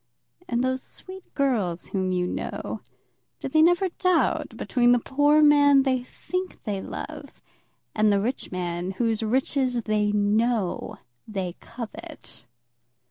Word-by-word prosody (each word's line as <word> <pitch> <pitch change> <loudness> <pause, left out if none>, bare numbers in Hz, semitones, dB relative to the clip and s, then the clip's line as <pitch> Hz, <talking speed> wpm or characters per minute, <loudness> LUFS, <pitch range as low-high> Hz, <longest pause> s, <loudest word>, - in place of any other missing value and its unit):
And 240 +1 +1
those 260 0 0
sweet 375 +6 -11
girls 220 - 0
whom 190 -1 -1
you 180 -1 0
know, - - -4 0.6
do - - -4
they 310 +4 +3
never 350 +4 +4
doubt 365 -1 +1
between 245 -1 +3
the - - +5
poor 290 +5 +3
man 285 -2 +6
they 260 -2 +1
think 365 +8 -5
they 205 -4 -3
love, - - -8 0.5
and 215 -1 +3
the 200 - +3
rich 240 +6 -3
man 180 0 -3
whose 225 +1 0
riches 250 +1 0
they 210 -1 +1
know 210 0 0 0.3
they 190 -4 -4
covet? 230 -2 -9
240 Hz, 135 wpm, -25 LUFS, 205-280 Hz, 0.6 s, man